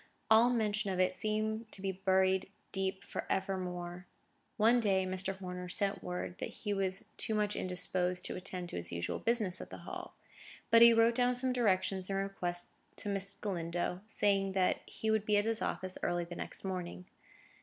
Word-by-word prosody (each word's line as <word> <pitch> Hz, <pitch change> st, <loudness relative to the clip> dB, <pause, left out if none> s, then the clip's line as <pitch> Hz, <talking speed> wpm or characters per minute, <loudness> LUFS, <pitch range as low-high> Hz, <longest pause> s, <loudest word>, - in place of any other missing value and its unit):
All 225 Hz, +2 st, +8 dB
mention 215 Hz, -3 st, 0 dB
of 185 Hz, -1 st, -1 dB
it 185 Hz, 0 st, +3 dB
seemed 215 Hz, +2 st, -1 dB, 0.4 s
buried 190 Hz, 0 st, +3 dB, 0.2 s
deep 190 Hz, 0 st, -2 dB
for -, -, -5 dB
evermore. 180 Hz, -2 st, -2 dB, 0.5 s
One 230 Hz, +3 st, +5 dB
day, 195 Hz, -4 st, +2 dB
Mr. 190 Hz, +1 st, -2 dB
Horner 180 Hz, -1 st, -6 dB
sent 195 Hz, +2 st, -1 dB
word 180 Hz, 0 st, -4 dB
that -, -, -3 dB
he 205 Hz, -2 st, -3 dB
was 190 Hz, -1 st, -1 dB
too 220 Hz, -, -2 dB
much 210 Hz, -1 st, +1 dB
indisposed 180 Hz, 0 st, -1 dB
to -, -, -4 dB
attend 180 Hz, -1 st, -5 dB
to -, -, -5 dB
his 85 Hz, 0 st, -4 dB
usual 85 Hz, 0 st, -2 dB
business 215 Hz, -6 st, +1 dB
at -, -, -8 dB
the -, -, -10 dB
Hall; -, -, -7 dB, 0.6 s
but 230 Hz, -, +8 dB
he 235 Hz, 0 st, +11 dB
wrote 230 Hz, +1 st, +5 dB
down 250 Hz, +1 st, +2 dB
some 255 Hz, +1 st, 0 dB
directions 190 Hz, -5 st, +1 dB
and 195 Hz, -, 0 dB
requests 180 Hz, -3 st, -3 dB, 0.2 s
to 205 Hz, -, -4 dB
Miss 195 Hz, 0 st, -1 dB
Galindo, 175 Hz, -2 st, -2 dB
saying 195 Hz, -3 st, +1 dB
that 185 Hz, -1 st, +2 dB
he 220 Hz, -, -2 dB
would 220 Hz, -1 st, +2 dB
be 210 Hz, -1 st, +3 dB
at 205 Hz, -, +2 dB
his 225 Hz, 0 st, +1 dB
office 185 Hz, 0 st, -2 dB
early 175 Hz, 0 st, 0 dB
the 170 Hz, +1 st, -7 dB
next -, -, -4 dB
morning. 180 Hz, -1 st, -4 dB
195 Hz, 180 wpm, -34 LUFS, 180-215 Hz, 0.6 s, he